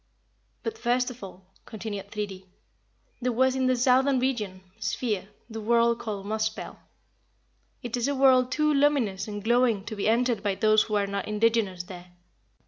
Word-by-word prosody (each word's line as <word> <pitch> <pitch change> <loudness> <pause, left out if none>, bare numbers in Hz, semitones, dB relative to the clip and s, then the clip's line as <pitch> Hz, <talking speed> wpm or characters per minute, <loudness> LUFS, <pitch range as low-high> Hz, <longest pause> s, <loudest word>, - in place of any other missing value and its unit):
"But, 445 0 -4
first 250 +1 +1
of 250 -3 -12
all," 190 -1 -10 0.2
continued 205 -3 -6
Thridi, 200 -3 -5 0.7
"there 250 +1 0
was 260 +2 +2
in 260 -1 +1
the 255 - +3
southern 260 +2 +3
region 220 -8 -2 0.2
(sphere) 210 -6 -2 0.2
the 225 -1 -7
world 235 +1 +3
called 205 -3 -5
Muspell. 215 +1 -3 1.0
It 240 -1 -3
is 245 +1 -1
a 285 - 0
world 260 -2 +4
too 305 0 +2
luminous 270 -9 +1
and 205 -1 -6
glowing 235 -3 +2
to 220 - -5
be 205 +1 0
entered 240 0 +2
by 200 -2 0
those 215 +1 +4
who 215 - -2
are 205 -1 +2
not 200 0 -4
indigenous 210 -4 +1
there. 180 0 -10
225 Hz, 165 wpm, -27 LUFS, 205-250 Hz, 1.0 s, world